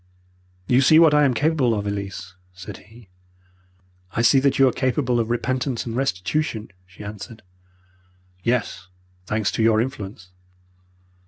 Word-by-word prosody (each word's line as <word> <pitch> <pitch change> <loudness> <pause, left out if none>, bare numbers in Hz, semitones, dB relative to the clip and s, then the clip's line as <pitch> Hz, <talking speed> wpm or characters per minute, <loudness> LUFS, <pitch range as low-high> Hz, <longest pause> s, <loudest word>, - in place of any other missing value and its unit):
"'You 125 +6 +3
see 155 +4 +6
what 160 -2 +6
I 150 0 +5
am 130 -3 +1
capable 145 -6 +2
of, 100 -1 -3
Elise,' 95 -3 -5 0.2
said 90 0 -9
he. 110 -2 -18 1.0
"'I 115 - 0
see 135 +3 +5
that 135 0 +1
you 135 - +6
are - - +3
capable 125 -1 0
of 115 -1 -1
repentance 125 +1 -1
and 115 -1 -5
restitution,' 120 - -2 0.2
she 95 +3 -13
answered. 105 +2 -9 1.0
"'Yes, 115 -4 -1 0.4
thanks 105 0 0
to - - -2
your 110 -1 +4
influence! 100 -6 -5
115 Hz, 145 wpm, -22 LUFS, 105-130 Hz, 1.0 s, see